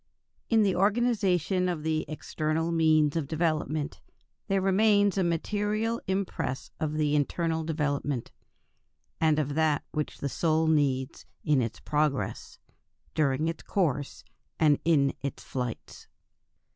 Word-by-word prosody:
In 225 -2 +4
the 195 -3 +2
organization 195 -4 +2
of 165 -4 -3
the 155 0 0
external 155 +1 -2
means 155 -2 +3
of 160 -4 -1
development, 155 -1 -1 0.5
there 195 -2 +2
remains 205 +1 +3
a 190 - +2
material 210 +6 -1
impress 190 -8 -2
of 155 -1 -1
the 150 -1 +1
internal 160 +2 0
development, 145 -5 -2 0.9
and 155 -2 +3
of 145 -2 -1
that 155 -1 +1
which 150 -1 -3
the 140 - -3
soul 160 +3 +1
needs 140 -3 0 0.2
in 150 -4 +3
its 115 -2 -3
progress, 150 -2 -1 0.6
during 150 0 +1
its 165 -1 -3
course, 145 -8 -1 0.4
and 150 -3 +4
in 140 -5 +3
its 140 - -5
flights. 125 -3 -6
160 Hz, 125 wpm, -28 LUFS, 145-180 Hz, 0.9 s, In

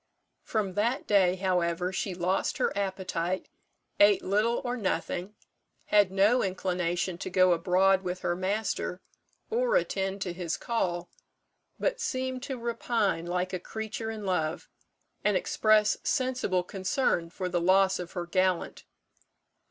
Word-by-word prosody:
From 205 -4 -2
that 230 +7 0
day, 190 -3 +4
however, 180 -1 0
she 185 0 -2
lost 180 +2 0
her - - 0
appetite, 185 -2 -2 0.5
ate 205 -1 +6
little 215 +5 +1
or 245 0 -1
nothing, 200 -2 -2 0.5
had 205 -3 +4
no 205 +6 +4
inclination 180 -2 -1
to - - -4
go 185 0 +4
abroad 185 +3 +3
with 180 -1 -4
her 175 - 0
master, 190 0 -2 0.5
or - - +2
attend 195 - 0
to 180 - -4
his 175 -2 -3
call, 180 -7 -2 0.7
but - - 0
seemed 260 - -2
to 265 0 -4
repine 230 -7 -1
like 180 +1 -1
a 185 - -1
creature 220 +3 -5
in 215 -2 -5
love, 165 -3 -1 0.6
and 210 -2 +3
express 215 +2 +3
sensible 255 -9 0
concern 185 -1 0
for 180 +2 -4
the 175 -1 -1
loss 190 +2 +4
of 175 -1 -7
her 175 -1 -3
gallant. 185 0 0
190 Hz, 135 wpm, -28 LUFS, 180-215 Hz, 0.7 s, ate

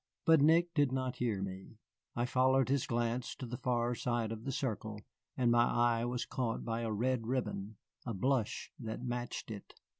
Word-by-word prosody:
But 160 -3 +6
Nick 165 +3 +5
did 145 -4 +3
not 130 -1 -1
hear 110 -6 0
me. 95 +3 -7 0.4
I 120 - +1
followed 130 +1 +3
his 140 -1 +1
glance 120 +1 -1
to 130 - -6
the 120 0 -5
far 120 -1 +1
side 120 -2 -1
of 115 +1 -6
the 135 - -1
circle, 110 -5 -3 0.4
and 125 -2 +3
my 120 0 +5
eye 120 -1 +2
was 125 0 -2
caught 125 -4 -2
by 115 0 -1
a 115 -1 -1
red 115 +2 0
ribbon, 115 -5 -2 0.3
a 115 -4 -3
blush 125 +2 0
that 115 0 -5
matched 120 -2 -4
it. 105 -2 -9
120 Hz, 185 wpm, -34 LUFS, 115-130 Hz, 0.4 s, But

